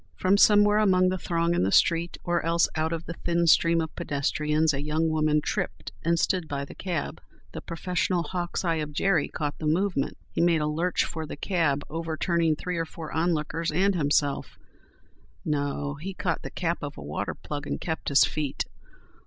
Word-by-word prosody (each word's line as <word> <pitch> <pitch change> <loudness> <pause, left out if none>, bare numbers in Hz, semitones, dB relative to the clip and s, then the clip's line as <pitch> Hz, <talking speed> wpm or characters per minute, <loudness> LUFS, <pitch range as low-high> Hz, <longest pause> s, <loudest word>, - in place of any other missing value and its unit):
From 185 +2 +3
somewhere 205 0 +6
among 185 -3 +4
the 185 0 -2
throng 170 0 0
in - - +1
the 95 +2 +1
street 170 - +3
or 175 0 0
else 170 +1 +3
out 160 0 0
of 165 0 -3
the 170 - -5
thin 170 0 0
stream 165 +1 +4
of 160 - -5
pedestrians 150 +2 0
a 140 - -2
young 155 +2 0
woman 155 -1 +2
tripped - - -3
and 170 +1 +2
stood 180 0 0
by 140 -1 -3
the - - -11
cab. 175 -5 -4 0.3
The - - -7
professional 180 +1 -1
hawk's 175 +2 -3
eye 165 -1 +1
of 150 -1 -4
Jerry 170 -1 +2
caught 145 -2 -4
the 155 - -2
movement. 175 -2 0
He - - -1
made 170 -2 +3
a - - +1
lurch 165 +4 0
for 160 -1 -5
the - - -7
cab, 150 -6 0
overturning 165 0 0
three 180 +3 -4
or 165 - 0
four 160 -1 -8
onlookers 165 0 0
and 195 +5 +2
himself—no! 145 -4 +1 1.5
he 190 +2 -5
caught 170 -4 -1
the - - -6
cap 170 -1 -2
of 145 -1 -6
a 75 - -8
water 75 +2 -3
plug 145 -1 -6
and - - -3
kept 160 -2 -3
his 140 - +6
feet. 150 -3 -2
165 Hz, 190 wpm, -27 LUFS, 150-175 Hz, 1.5 s, somewhere